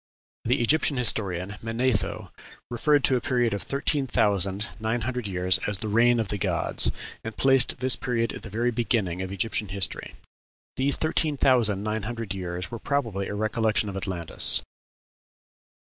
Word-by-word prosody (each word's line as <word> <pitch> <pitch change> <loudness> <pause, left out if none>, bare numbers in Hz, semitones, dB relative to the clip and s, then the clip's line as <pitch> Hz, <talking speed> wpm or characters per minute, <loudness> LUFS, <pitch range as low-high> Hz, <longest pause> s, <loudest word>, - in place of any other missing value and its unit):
The 120 +1 +1
Egyptian 145 +2 +2
historian, 100 -5 +2
Manetho, 115 0 -1 0.4
referred 145 +4 +2
to 130 - +4
a - - -4
period 120 -4 0
of 100 - -3
thirteen 140 0 -1
thousand 100 -2 0
nine 110 +2 -1
hundred 125 -1 -3
years 90 -1 0
as 105 -2 -1
"the 110 - -4
reign 120 +3 +3
of 110 - -2
the 105 - -2
gods," - - 0 0.3
and 110 -1 -7
placed 135 -1 +4
this 130 -1 +4
period 115 -4 -2
at - - -8
the 115 - -9
very 120 +4 -1
beginning 110 -7 -1
of 95 0 -5
Egyptian 105 +2 -1
history. 95 0 -2 0.6
These 135 +1 +4
thirteen 155 -2 0
thousand 115 -8 +2
nine 110 +1 -2
hundred 115 -1 -5
years 90 0 -5
were 115 - -6
probably 115 -10 -2
a 105 - -5
recollection 110 0 0
of 95 - -7
Atlantis. 95 -4 +3
110 Hz, 160 wpm, -25 LUFS, 100-125 Hz, 0.6 s, to